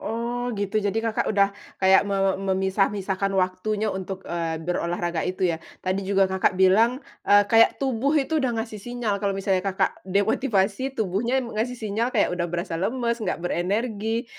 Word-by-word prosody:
Oh 240 +2 -3
gitu, 205 +1 0
jadi 205 +1 -1
Kakak 225 -1 0
udah 200 -1 +3 0.2
kayak 190 0 +5
me 200 - 0 0.2
memisah-misahkan 195 0 0
waktunya 200 +3 0
untuk, 190 0 -6
eee, 165 -1 -2
berolahraga 170 0 -2
itu 185 +1 -2
ya. 160 - -5 0.2
Tadi 185 +1 0
juga 195 -1 +4
Kakak 190 -1 +1
bilang, 225 +8 +4 0.2
eee, 205 0 +7
kayak 225 +2 +5
tubuh 275 +3 0
itu 305 +2 +1
udah 245 -4 0
ngasih 225 -2 -4
sinyal 230 -4 -3
kalau 200 -1 -1
misalnya 195 -1 +1
Kakak 195 0 -1
demotivasi, 210 +4 +1
tubuhnya 230 +6 0
ngasih 235 +2 -3
sinyal 220 +1 -1
kayak 200 - +3
udah 175 -1 -1
berasa 170 -1 -3
lemes, 235 +2 -1
enggak 215 - -2
berenergi, 220 +6 -1
200 Hz, 160 wpm, -24 LUFS, 190-230 Hz, 0.2 s, eee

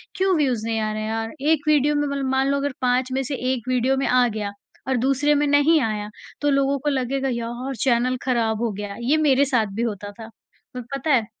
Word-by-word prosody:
क्यों 380 -1 +2
व्यूज़ 255 -7 0
नहीं 225 -1 -1
आ 215 0 -1
रहे 215 - -4
हैं 215 - -3
यार? 225 0 -3
एक 305 0 +1
वीडियो 295 -1 +3
में 290 0 0
मतलब 280 -1 -2
मान 265 0 +2
लो 280 - +1
अगर 280 -1 -2
5 250 +1 +1
में 265 +1 0
से 275 +2 -3 0.2
1 245 -3 -6
वीडियो 255 +1 +1
में 270 - 0
आ 250 -1 +4
गया 210 -3 -4 0.4
और 265 -1 +1
दूसरे 275 +4 +2
में 295 +1 +2
नहीं 290 +3 +4
आया, 210 -3 -2 0.3
तो 290 - +2
लोगों 275 0 +2
को 295 - -1
लगेगा 270 0 -1
यार, 240 +3 -4
चैनल 255 0 +2
खराब 230 -4 0
हो 235 -2 0
गया, 205 0 -6
ये 270 +6 +2
मेरे 285 -3 +3
साथ 245 -6 +1
भी 225 - -2
होता 205 -3 -3
था। 225 0 -8 0.4
पर 250 - -5
पता 275 +3 -3
है? 235 -4 +3
255 Hz, 235 wpm, -23 LUFS, 230-280 Hz, 0.4 s, आ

